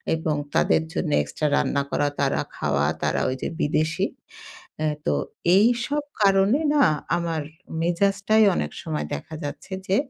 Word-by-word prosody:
এবং 160 -1 -1 0.2
তাদের 80 +1 +3
জন্য - - -1
extra 75 - -2
রান্না 140 -1 +1
করা, 145 - +1
তারা - - +1
খাওয়া, 75 0 0 0.2
তারা - - +1
ওই 130 - -2
যে - - -1
বিদেশী। 155 +5 +1 0.8
আ - - +2 0.2
তো, - - +2 0.4
এইসব 245 +7 +2 0.2
কারণে 195 +7 +4 0.2
না 285 -3 +6 0.3
আমার 165 -2 -2 0.4
মেজাজটাই 195 +5 +2
অনেক 75 - -2
সময় 75 -1 -3
দেখা 115 - -9
যাচ্ছে 145 +6 -7 0.2
যে 190 - +2
165 Hz, 145 wpm, -24 LUFS, 140-200 Hz, 0.8 s, না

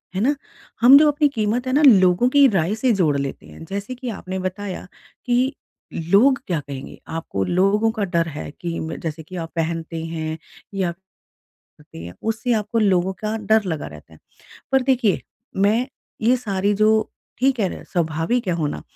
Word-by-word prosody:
है 190 - 0
ना? 280 +6 +2 0.5
हम 255 +4 +9
जब 300 +1 +6
अपनी 295 0 +3
कीमत 225 +3 0
है 255 - 0
ना 290 - +4
लोगों 190 0 +5
की 285 +1 +6
राय 195 -3 +1
से 250 +3 +1
जोड़ 160 -8 +2
लेते 140 -1 -4
हैं - - -12
जैसे 200 +6 -4
कि 250 0 -6
आपने 190 -3 -5
बताया 185 +1 -5 0.4
कि 250 +2 +2 0.4
लोग 200 +12 +3
क्या 170 -4 0
कहेंगे? 140 -2 -9
आपको 160 -12 -3
लोगों 195 - +2
का 220 -2 -3
डर 170 -3 0
है 150 -2 -6
कि 170 -1 -3
म 160 - -5
जैसे 160 -1 -4
कि 185 +4 -11
आप 165 -2 -5
पहनते 165 0 -3
हैं 160 -1 -4 0.4
या 190 -3 0 1.0
ते - - -11
है 85 - -8
उससे 225 +2 -1
आपको 220 +1 0
लोगों 190 -3 +2
का 215 +1 -1
डर 220 0 +2
लगा 165 -6 -3
रहता 75 +1 -13
है 80 - -17 0.5
पर 265 -1 +4
देखिए 250 -6 +2 0.4
मैं 210 +6 +2 0.4
ये 240 +3 +4
सारी 205 -4 -1
जो 215 +1 +3 0.5
ठीक 260 0 +2
है 190 -3 -2
स्वाभाविक 170 +8 -1
है - - +2
होना। 155 -3 -2
195 Hz, 180 wpm, -21 LUFS, 165-235 Hz, 1.0 s, हम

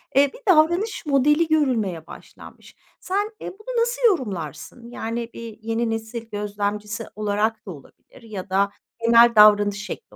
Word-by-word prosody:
eee, 280 +1 +4
bir - - -13 0.2
davranış 345 +7 +1
modeli 295 +3 +3
görülmeye 230 - 0
başlanmış. - - -14 0.2
Sen, 405 +3 -2
eee, - - -6
bunu 465 +5 -3
nasıl 480 +2 -1
yorumlarsın? 225 - -4
Yani 230 0 -4
bir 230 -2 -9
yeni 225 +1 -2
nesil 225 +1 -5
gözlemcisi 210 +1 -4
olarak 210 +1 -1
da 195 - -7
olabilir 145 - -16
ya 205 -4 -8
da 200 +1 +1 0.3
genel 235 0 +6
davranış 205 -1 +5
şekli 450 - -9
230 Hz, 140 wpm, -22 LUFS, 205-295 Hz, 0.3 s, genel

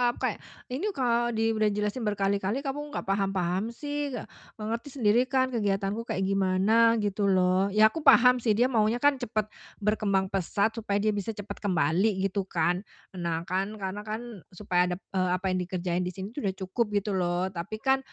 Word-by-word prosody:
aku - - -14
kayak, - - 0 0.3
"Ini 315 +12 -2
kalo 240 -2 +1
di 225 0 +2
udah 215 -1 +2
dijelasin 210 +3 -1
berkali-kali 200 +4 0
kamu 275 0 -3 0.2
gak - - -2
paham-paham 195 +2 -1
sih, 290 -1 -3 0.4
mengerti 230 +4 -4
sendiri 240 +1 +3
kan 260 0 +1
kegiatanku 205 0 -1
kayak 190 - -1
gimana, 195 +4 +3
gitu 205 0 0
loh." 185 0 +3
Ya, 215 +1 +6
aku 325 - -4
paham 250 -4 +6
sih, 220 -3 +1
dia 250 +3 +2
maunya 225 +3 +1
kan 285 -2 +4
cepet 215 -3 -2 0.3
berkembang 200 -3 +1
pesat 200 +3 0
supaya 205 -2 -2
dia 215 - +3
bisa 205 +2 -3
cepet 205 -1 -7
kembali 190 +2 +1
gitu 195 0 -1
kan. 175 0 +1 0.3
Nah 170 -3 -3
kan, 190 +4 -2
karena 195 0 -4
kan 215 0 -6 0.2
supaya 180 -3 +1
dap 190 - -15
eee, 185 -1 +1
apa 185 +1 -2
yang 185 - 0
dikerjain 180 -1 -2
di 180 - -6
sini 195 +2 -6
tuh 285 - -6
udah 190 - -2
cukup 190 +5 -1 0.2
gitu 210 - -3
loh, 180 0 0
tapi 195 +6 -6
kan 265 0 +3
205 Hz, 185 wpm, -28 LUFS, 190-230 Hz, 0.4 s, Ya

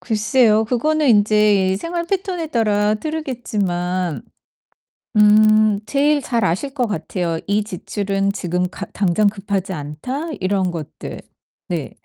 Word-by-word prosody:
글쎄요. 220 +2 +2
그거는 300 +6 +1
인제 210 -3 +4
생활 340 +5 -3
패턴에 365 -3 -2
따라 210 -5 +1
다르겠지만 200 - -2 0.9
음 215 0 +5
제일 290 +3 +2
잘 235 -4 -1
아실 190 +12 -1
것 250 -4 0
같아요. 170 -3 -3
'이 205 +1 +1
지출은 195 0 -2
지금 180 -2 -2
가 200 - -7
당장 205 +1 +2
급하지 195 -2 -2
않다.' 165 - -5
이런 185 -1 0
것들. 155 -3 -7 0.5
네. - - -3
210 Hz, 245 characters per minute, -20 LUFS, 185-245 Hz, 0.9 s, 음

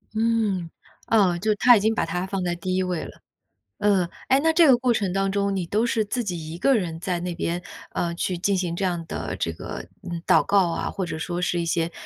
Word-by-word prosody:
嗯， 215 -6 +1 0.4
哦， 195 -6 +3
就 215 +2 +1
他 245 +4 +7
已 - - +4
经 220 +2 +2
把 - - 0
他 180 +1 -2
放 190 -1 -2
在 175 -1 0
第 185 +2 -3
一 185 - +1
位 180 -3 -2
了。 - - -11 0.6
嗯， 195 -4 +3 0.2
诶， 265 +1 +5
那 320 +2 +2
这 335 0 +6
个 255 -3 +7
过 250 -1 +2
程 200 -5 0
当 195 +1 0
中 200 0 0
你 185 -2 -1
都 215 +7 +1
是 225 -2 +1
自 240 +4 -2
己 165 -6 -5
一 - - -6
个 270 +9 +3
人 170 -6 -2
在 180 -1 -2
那 175 0 -3
边， 170 +1 -2 0.3
呃， 170 -1 -2
去 180 +1 -2
进 195 +3 +1
行 180 -2 -1
这 190 +2 -1
样 175 -2 -1
的 - - -4
这 85 - -1
个 80 - -7 0.2
嗯， 170 -2 -5
祷 155 -3 +5
告 195 -3 +3
啊， 165 - -2
或 190 - -3
者 165 - -5
说 175 +2 -3
是 175 -1 0
一 170 - -1
些 165 0 0
185 Hz, 265 characters per minute, -24 LUFS, 175-210 Hz, 0.6 s, 他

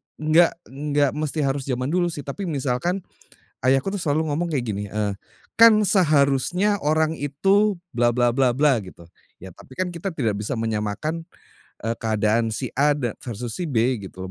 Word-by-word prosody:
enggak 155 +3 +3 0.2
enggak 145 0 0
mesti 150 0 -2
harus 135 0 -1
jaman 130 +2 -2
dulu 175 0 +2
sih, 155 -4 -5
tapi 140 +9 -5
misalkan 145 +5 -1 0.6
ayahku 135 +9 +2
tuh 200 - -3
selalu 155 0 0
ngomong 170 +3 -2
kayak 135 -6 -1
gini, 100 -2 -4
eee, 105 -2 -1 0.4
kan 230 0 +8 0.2
seharusnya 160 +3 +3
orang 155 +1 +1
itu 195 +8 +1 0.2
bla 120 0 +3
bla 120 0 +1
bla 130 -1 +3
bla 135 -2 +2
gitu, 90 -3 -13 0.3
ya 95 -1 -11
tapi 130 - -16
kan 180 -2 -2
kita 170 +3 -4
tidak 125 - -1
bisa 105 +5 -3
menyamakan, 110 +9 -2 0.6
eee, 115 +2 -2
keadaan 110 0 +1
si 130 +2 -3
A 145 +1 +4
dan 125 -6 -4
versus 120 -1 -6
si 180 - -2
B 125 -3 +1
gitu 95 0 -8
140 Hz, 170 wpm, -23 LUFS, 115-160 Hz, 0.6 s, kan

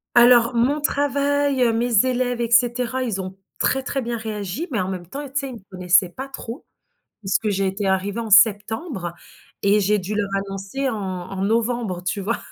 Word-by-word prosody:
Alors, 240 0 +6
mon 265 +6 +2
travail, 285 -2 +1
heu, 235 -2 +4
mes 230 -1 +3
élèves 245 -1 0
et 235 - -1
cetera, 245 +1 +2
ils 215 -6 -2
ont 190 0 -7 0.2
très, 265 0 +1
très 270 +1 -2
bien 235 0 -3
réagi, 215 - -4
mais 230 - 0
en 185 - -2
même 185 -2 -5
temps, 280 - -6
tu 275 +2 -2
sais, 275 -1 -3
ils - - -8
me 230 - -10
connaissaient 180 0 +3
pas 260 +10 -7
trop, 270 -1 -8 0.5
puisque 200 +2 0
j'ai 195 -1 0
été 195 +1 -1
arrivée 195 +4 0
en 225 - -5
septembre 205 - +3 0.5
et 200 +1 +4
j'ai 205 +1 +2
dû 195 +2 -4
leur 205 -1 -1 0.2
annoncer 195 +8 -3
en 250 - -2
en 190 -1 -5
novembre, 225 -3 -1
tu 185 +3 -2
vois? 215 +4 -1
225 Hz, 195 wpm, -22 LUFS, 195-250 Hz, 0.5 s, Alors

